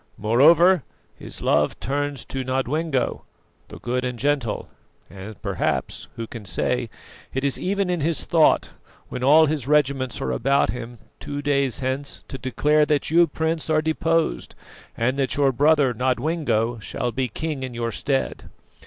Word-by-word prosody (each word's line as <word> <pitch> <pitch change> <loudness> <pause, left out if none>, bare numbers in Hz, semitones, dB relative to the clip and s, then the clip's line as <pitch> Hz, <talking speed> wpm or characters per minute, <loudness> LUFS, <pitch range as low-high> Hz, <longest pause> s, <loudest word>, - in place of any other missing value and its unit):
Moreover 155 - +5 0.3
his - - -9
love - - +2
turns 145 -1 -3
to 135 -1 -4
Nodwengo, 135 +3 -1 0.5
the - - -10
good 125 +1 -2
and 125 -1 -3
gentle; 135 -4 -1 0.4
and 100 +2 -9
perhaps - - -2
who 115 - -4
can 115 -1 -9
say? 120 +4 -1 0.5
it 135 - -1
is 140 -1 0
even 195 +1 0
in 175 -3 -1
his 160 +2 -1
thought, 160 -2 +3 0.4
when 125 - -5
all 155 +4 +7
his 145 -4 -2
regiments 140 -4 +1
are - - -2
about 135 +3 +2
him 120 -1 -7 0.2
two 145 0 -5
days 140 -2 0
hence, 135 +2 -3
to 135 - -6
declare 150 +4 +2
that 150 0 0
you, 170 +1 +5
Prince, 160 0 -2
are 155 -1 +3
deposed, 165 +1 0 0.4
and 130 +4 0
that 135 -2 0
your 140 -2 +3
brother, 145 0 +3
Nodwengo, 125 -2 0
shall 120 +3 -3
be 130 +1 -1
king 150 +4 -4
in 130 -2 -5
your 115 0 -2
stead. 135 +4 -2
135 Hz, 155 wpm, -23 LUFS, 125-155 Hz, 0.5 s, all